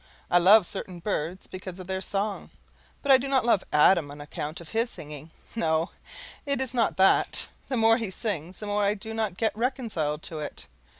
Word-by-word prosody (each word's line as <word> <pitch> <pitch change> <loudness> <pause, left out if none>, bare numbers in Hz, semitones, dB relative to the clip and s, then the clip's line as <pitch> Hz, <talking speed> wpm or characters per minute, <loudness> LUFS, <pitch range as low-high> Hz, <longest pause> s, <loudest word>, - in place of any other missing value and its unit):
I 175 - +6
love 195 +3 +7
certain 185 -1 -5
birds 180 -1 -3
because 185 0 -8
of 185 - -7
their 190 +1 -3
song; 200 +1 -2 0.5
but 280 - +3
I 265 - +8
do 270 - -4
not 270 -3 +2
love 220 -5 +3
Adam 150 0 +4
on 145 +1 -10
account 150 +2 -6
of 170 - -11
his 230 +2 0
singing 150 - -9 0.3
no, 160 -6 0 0.5
it 280 -1 0
is 260 -1 -1
not 230 -5 +1
that; 190 0 +3 0.2
the 260 - -1
more 225 0 +5
he 225 -5 -3
sings 185 -3 -4
the 210 - -7
more 205 0 0
I 200 +1 +2
do 220 +2 -7
not 215 -5 -2
get 220 0 0
reconciled 220 - -2
to 160 - -3
it. 150 - -6
195 Hz, 200 wpm, -27 LUFS, 170-225 Hz, 0.5 s, I